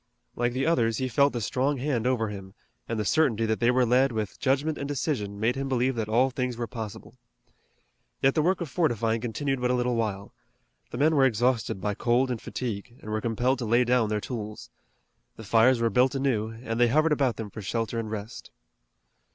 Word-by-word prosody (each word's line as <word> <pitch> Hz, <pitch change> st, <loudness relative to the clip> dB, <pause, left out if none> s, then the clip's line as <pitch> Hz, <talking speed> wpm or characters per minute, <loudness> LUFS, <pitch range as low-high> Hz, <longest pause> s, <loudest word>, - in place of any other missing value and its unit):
Like 120 Hz, 0 st, 0 dB
the 130 Hz, +2 st, -1 dB
others, 115 Hz, -9 st, +2 dB
he 130 Hz, -, -1 dB
felt 140 Hz, +3 st, +3 dB
the 120 Hz, -, -4 dB
strong 135 Hz, +6 st, 0 dB
hand 125 Hz, -3 st, -1 dB
over 115 Hz, -4 st, 0 dB
him, 95 Hz, -1 st, -9 dB, 0.3 s
and 115 Hz, -1 st, -2 dB
the 105 Hz, -, -1 dB
certainty 115 Hz, -6 st, +2 dB
that 110 Hz, 0 st, 0 dB
they 120 Hz, -, +3 dB
were 125 Hz, 0 st, +3 dB
led 125 Hz, +3 st, +3 dB
with 110 Hz, -3 st, -4 dB
judgment 140 Hz, +3 st, 0 dB
and 140 Hz, -, -3 dB
decision 125 Hz, -8 st, -2 dB
made 115 Hz, +4 st, +1 dB
him 135 Hz, 0 st, -3 dB
believe 130 Hz, 0 st, +1 dB
that 110 Hz, -3 st, -3 dB
all 125 Hz, +4 st, +3 dB
things 125 Hz, -1 st, -3 dB
were 120 Hz, -, -2 dB
possible. 110 Hz, -3 st, -8 dB, 1.0 s
Yet 135 Hz, 0 st, +3 dB
the 155 Hz, -, +2 dB
work 180 Hz, +4 st, +1 dB
of 170 Hz, -, -2 dB
fortifying 115 Hz, -, 0 dB
continued 135 Hz, +3 st, -2 dB
but 125 Hz, -, +1 dB
a 125 Hz, -, +2 dB
little 125 Hz, 0 st, 0 dB
while. 105 Hz, -4 st, -3 dB, 0.6 s
The -, -, -6 dB
men 155 Hz, +4 st, +3 dB
were 135 Hz, -2 st, +5 dB
exhausted 120 Hz, -3 st, 0 dB
by 105 Hz, +2 st, -1 dB
cold 125 Hz, +4 st, +1 dB
and 120 Hz, -, -3 dB
fatigue, 120 Hz, -1 st, -5 dB
and 105 Hz, -, -8 dB
were 110 Hz, 0 st, -1 dB
compelled 120 Hz, +3 st, 0 dB
to 120 Hz, -, -3 dB
lay 120 Hz, +3 st, +3 dB
down 120 Hz, -3 st, +2 dB
their 105 Hz, 0 st, 0 dB
tools. 105 Hz, -2 st, -7 dB, 0.6 s
The 110 Hz, -, -10 dB
fires 115 Hz, +4 st, +4 dB
were 115 Hz, -1 st, +1 dB
built 130 Hz, +2 st, +3 dB
anew, 130 Hz, -6 st, 0 dB
and 115 Hz, 0 st, -5 dB
they 120 Hz, -, +5 dB
hovered 155 Hz, +6 st, +3 dB
about 135 Hz, -6 st, +2 dB
them 105 Hz, -1 st, -6 dB
for 110 Hz, -, -7 dB
shelter 115 Hz, +3 st, -2 dB
and 110 Hz, -1 st, -4 dB
rest. 105 Hz, +1 st, -7 dB
120 Hz, 215 wpm, -27 LUFS, 110-130 Hz, 1.0 s, were